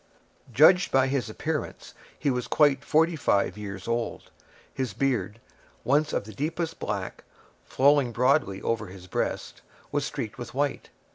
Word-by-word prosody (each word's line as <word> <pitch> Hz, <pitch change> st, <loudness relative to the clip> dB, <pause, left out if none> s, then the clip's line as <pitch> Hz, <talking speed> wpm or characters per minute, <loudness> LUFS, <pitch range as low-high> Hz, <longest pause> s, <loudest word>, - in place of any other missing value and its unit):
Judged 160 Hz, +8 st, +5 dB
by 135 Hz, 0 st, +4 dB
his 135 Hz, -3 st, -1 dB
appearance, 155 Hz, +7 st, -4 dB, 0.2 s
he 145 Hz, -, 0 dB
was 125 Hz, -1 st, -2 dB
quite 145 Hz, -3 st, +3 dB
forty 160 Hz, +3 st, +3 dB
five 100 Hz, -10 st, +1 dB
years 100 Hz, -2 st, -7 dB
old. 115 Hz, 0 st, -3 dB, 0.4 s
His 130 Hz, -6 st, -3 dB
beard, 120 Hz, -5 st, -1 dB, 0.4 s
once 150 Hz, +3 st, +2 dB
of -, -, -1 dB
the 110 Hz, +1 st, -11 dB
deepest 165 Hz, -, -3 dB
black, 100 Hz, -3 st, -4 dB, 0.4 s
flowing 140 Hz, -2 st, +3 dB
broadly 125 Hz, -5 st, +1 dB
over 115 Hz, -3 st, -1 dB
his 90 Hz, 0 st, -11 dB
breast, 90 Hz, -, -3 dB, 0.3 s
was 145 Hz, -1 st, 0 dB
streaked 130 Hz, -3 st, -5 dB
with 120 Hz, 0 st, -8 dB
white. 145 Hz, 0 st, -1 dB
130 Hz, 145 wpm, -27 LUFS, 110-145 Hz, 0.4 s, Judged